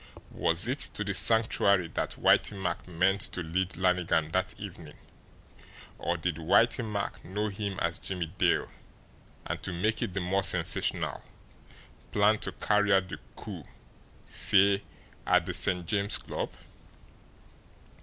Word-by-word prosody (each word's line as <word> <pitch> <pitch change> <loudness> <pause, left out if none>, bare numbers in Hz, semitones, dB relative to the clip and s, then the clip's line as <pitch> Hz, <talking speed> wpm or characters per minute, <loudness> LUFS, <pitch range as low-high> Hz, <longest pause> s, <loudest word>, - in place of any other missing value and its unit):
Was 85 +6 0
it 130 +4 -2 0.2
to 105 - -2
the 100 0 -2
Sanctuary 100 -3 +4
that - - -4
Whitey 100 - +3
Mack 90 -2 -3
meant 95 +3 +1
to 90 - -2
lead 90 +3 -2
Lannigan 90 -4 +1
that 95 +2 -1
evening 90 -6 -9 1.0
or 85 0 -1
did 85 -1 -2
Whitey 115 +9 +3
Mack 105 -2 -4
know 105 +3 -3
him 100 -1 -4
as 85 0 -1
Jimmie 90 -3 -4
Dale, - - +2 0.8
and - - -4
to 95 - -4
make 105 +6 -1
it 95 - -3
the - - 0
more 95 +2 0
sensational, 90 -3 +1 0.9
plan 105 +1 +3
to - - -2
carry 105 0 +1
out 95 -1 +3
the - - -7 0.2
coup, - - -8 0.6
say, 100 0 +3 0.5
at - - +3
the - - -4
St. 90 -1 0
James 100 +3 +3
Club? - - -5
95 Hz, 140 wpm, -29 LUFS, 90-100 Hz, 1.0 s, Sanctuary